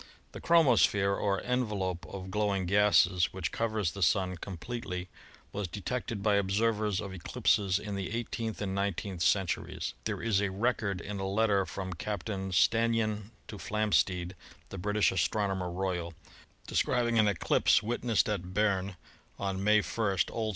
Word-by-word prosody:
The - - -9
chromosphere 105 - +4
or 100 -1 0
envelope 100 -9 -2
of 95 +1 -7
glowing 100 -2 0
gases 100 -2 +4
which 95 - -3
covers 110 -6 -1
the 100 - -8
Sun 90 0 +2
completely 90 0 -6 0.4
was 100 -2 -3
detected 105 +3 -4
by 105 -1 +3
observers 105 0 +1
of 100 -2 -5
eclipses 95 +1 +1
in 105 0 -5
the 95 -2 -3
eighteenth 115 -1 -3
and 95 -1 -2
nineteenth 100 -2 -2
centuries. 95 0 0
There - - -2
is 105 -4 +2
a 100 - 0
record 100 -1 -1
in 100 -1 -5
a 95 - -2
letter 100 -1 +2
from 95 -1 -5
Captain 95 +1 -4
Stannyan 110 +2 +2 0.2
to 105 - -8
Flamsteed, 95 -4 0 0.4
the 95 - -7
British 105 +3 +2
Astronomer 95 0 0
Royal, 90 -2 -3 0.5
describing 120 -2 +1
an 105 - +5
eclipse 100 +1 +3
wit 120 +3 -2
nessed 115 -4 +2
at 95 -3 -3
Berne 100 -2 +1 0.4
on 95 -1 -3
May 105 0 +4
1 105 -4 -1 0.2
(O. 115 -1 -1
S.) - - -1
100 Hz, 150 wpm, -30 LUFS, 95-110 Hz, 0.5 s, an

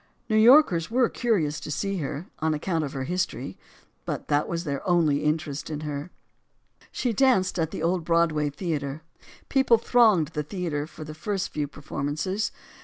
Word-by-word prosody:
New 215 - +2
Yorkers 220 - +6
were 245 +1 +3
curious 165 -11 0
to 150 - -8
see 195 +6 -2
her, 150 +1 -4
on 160 0 +1
account 160 +1 -1
of 140 - -5
her 135 -2 -3
history; 175 - -3 0.5
but - - -5
that 145 0 +2
was 170 0 -2
their 140 -4 -3
only 155 -5 +3
interest 150 -1 -1
in 150 -1 -4
her. 150 +1 -4 0.8
She 245 -3 -1
danced 195 -7 +3
at 160 -2 +1
the 160 - -5
old 175 +1 +1
Broadway 160 -3 +2
Theater. 145 -2 -4 0.4
People 265 -4 +4
thronged 220 - +4
the 150 -2 -3
theater 150 -2 -3
for 155 -1 -10
the 155 0 -8
first 190 +5 -3
few 150 -1 -2
performances. 150 +8 -3
160 Hz, 170 wpm, -26 LUFS, 150-190 Hz, 0.8 s, Yorkers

